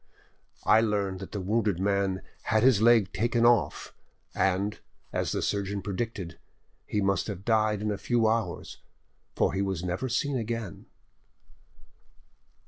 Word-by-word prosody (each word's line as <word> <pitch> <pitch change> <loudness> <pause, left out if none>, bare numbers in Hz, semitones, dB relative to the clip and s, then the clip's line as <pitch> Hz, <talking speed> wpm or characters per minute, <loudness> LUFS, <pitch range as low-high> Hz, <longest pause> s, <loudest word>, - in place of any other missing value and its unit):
"I 110 +1 +6
learned 100 -4 -1
that 95 - -8
the 105 - -4
wounded 105 -1 0
man 100 -1 0 0.2
had 110 0 +2
his 125 -5 +5
leg 115 -4 +5
taken 120 +1 +1
off, 115 -11 +2 0.4
and, 95 +2 0 0.3
as - - -1
the - - -1
surgeon 100 0 -2
predicted, 100 -4 -4 0.5
he 105 - 0
must 95 -2 +1
have 100 -2 -6
died 110 -2 +2
in 105 - 0
a 100 - -3
few 120 -2 +2
hours, 110 -5 -2 0.6
for - - +2
he 95 - 0
was 95 -3 -2
never 90 +9 -2
seen 135 +2 0
again." 115 -4 -5
105 Hz, 140 wpm, -28 LUFS, 95-115 Hz, 0.6 s, I